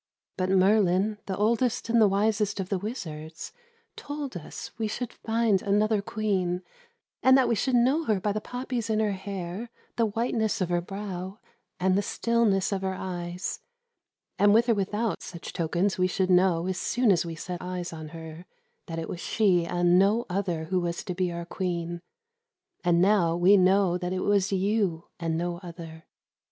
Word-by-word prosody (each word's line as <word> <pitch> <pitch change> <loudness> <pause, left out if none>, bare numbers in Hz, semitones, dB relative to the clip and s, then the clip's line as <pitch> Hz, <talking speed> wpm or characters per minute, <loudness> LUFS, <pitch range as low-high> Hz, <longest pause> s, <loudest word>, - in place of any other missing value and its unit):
But 185 0 -1
Merlin, 195 +1 +3
the 190 - -3
oldest 230 +3 +1
and 230 0 +3
the 215 - +7
wisest 205 +1 +1
of 190 -1 -3
the 195 - 0
wizards, 165 -7 -6 0.4
told 290 -5 -6
us 165 -3 -7
we 220 - 0
should 240 +2 -4
find 225 -4 +1
another 210 +1 +2
Queen, 190 -4 -1 0.6
and 260 0 +6
that 265 - +4
we - - +2
should 250 +4 +1
know 265 +7 +3
her 215 -6 +1
by 205 +2 0
the 215 +1 -2
poppies 245 -2 -4
in 215 -1 +1
her 215 -1 +1
hair, 195 +2 -5 0.3
the 230 -1 +3
whiteness 225 0 -1
of 185 -2 -1
her 175 0 +1
brow, 190 0 -6 0.4
and 185 +1 +2
the 200 - +3
stillness 215 -3 +1
of 195 -1 -1
her 190 0 -2
eyes, 175 -1 -4 0.8
and 205 +1 +6
with 235 +2 +4
or - - +6
without 210 +2 -1
such 170 -2 -8
tokens 180 +3 0
we 185 - +4
should 185 0 0
know, 180 -2 +4
as 185 0 -2
soon 245 -3 +2
as 175 -3 +3
we 165 -1 -6
set 180 +2 -6
eyes 180 -1 -4
on 160 -1 -7
her, 160 +2 -10 0.4
that 165 - -5
it 165 - -3
was 175 - -6
she 180 -5 +2
and 175 +1 +3
no 210 +5 +3
other 180 -4 -1
who 185 +3 0
was 170 -1 -3
to 180 - -4
be 180 0 -1
our 170 0 -5
Queen. 175 -1 -3 0.8
And 175 0 +3
now 185 -5 +3
we 180 +4 +6
know 185 -1 +4
that 180 0 -3
it 185 - -2
was 200 -1 +2
you 195 -3 0
and 165 -1 -1
no 175 0 -2
other. 165 -2 -10
190 Hz, 185 wpm, -27 LUFS, 175-215 Hz, 0.8 s, the